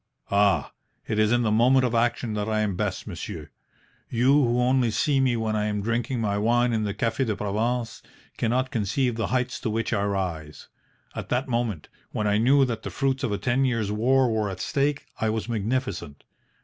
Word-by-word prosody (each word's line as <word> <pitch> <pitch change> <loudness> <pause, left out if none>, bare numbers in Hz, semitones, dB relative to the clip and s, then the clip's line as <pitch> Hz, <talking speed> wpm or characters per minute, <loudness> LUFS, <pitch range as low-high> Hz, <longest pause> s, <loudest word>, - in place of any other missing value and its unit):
"Ah, 100 0 +3 0.4
it 110 -1 -1
is 110 0 +3
in 120 0 +3
the 110 - +1
moment 125 +4 +4
of 120 - -1
action 115 -1 0
that 105 0 -2
I 110 0 +1
am 105 -3 -1
best, - - -2
monsieur. - - -7 0.6
You, 125 +3 +2
who 125 -4 +3
only 125 -1 +3
see 135 +5 +1
me 130 -3 +2
when 110 -1 -1
I 105 0 0
am 105 -1 -2
drinking 120 +3 -1
my 100 -2 0
wine 120 +2 +2
in 110 -1 0
the 100 - -2
Cafe 115 +4 0
de 110 -5 -1
Provence, 115 +4 -2 0.3
cannot 125 +3 0
conceive 115 +4 0
the 115 - -1
heights 125 0 -1
to 115 - -2
which 115 +2 -1
I 100 -3 +1
rise. 90 -7 -3 0.5
At - - -6
that 130 +4 0
moment, 115 - -2 0.2
when 105 - -3
I 105 0 +2
knew 135 +4 +5
that 115 -3 -3
the - - -5
fruits 135 -1 -1
of 120 - 0
a 100 - 0
ten 120 +6 +1
years' 115 -6 0
war 130 +5 +3
were 110 -2 0
at 95 -1 -6
stake, 140 0 -1
I 110 - +1
was 110 +1 -2
magnificent. 110 - -3
115 Hz, 205 wpm, -25 LUFS, 105-125 Hz, 0.6 s, knew